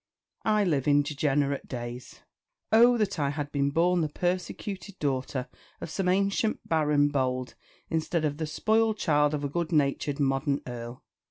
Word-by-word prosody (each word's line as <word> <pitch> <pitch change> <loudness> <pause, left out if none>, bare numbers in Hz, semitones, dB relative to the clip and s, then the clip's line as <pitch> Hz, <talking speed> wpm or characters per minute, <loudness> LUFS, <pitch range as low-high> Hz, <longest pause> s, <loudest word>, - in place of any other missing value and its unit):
I 215 -1 +3
live 150 -8 0
in 145 0 +5
degenerate 140 -1 0
days. 120 0 -7 0.5
Oh 240 +2 +6
that 200 -5 -1
I 140 -1 +1
had 145 0 -4
been 140 -1 +1
born 175 +4 +2
the 155 - 0
persecuted 185 +4 -3
daughter 130 -2 -2 0.3
of 160 - -7
some 185 0 0
ancient 200 +3 0
baron 150 -2 +3
bold 130 -2 -1 0.3
instead 160 0 -1
of 145 -1 -1
the 160 -1 -3
spoiled 220 +6 +1
child 150 -4 +2
of 145 - -4
a - - 0
good 170 +3 -2
natured 145 -1 +1
modern 135 0 +1
earl! 120 0 -7
150 Hz, 160 wpm, -28 LUFS, 140-180 Hz, 0.5 s, Oh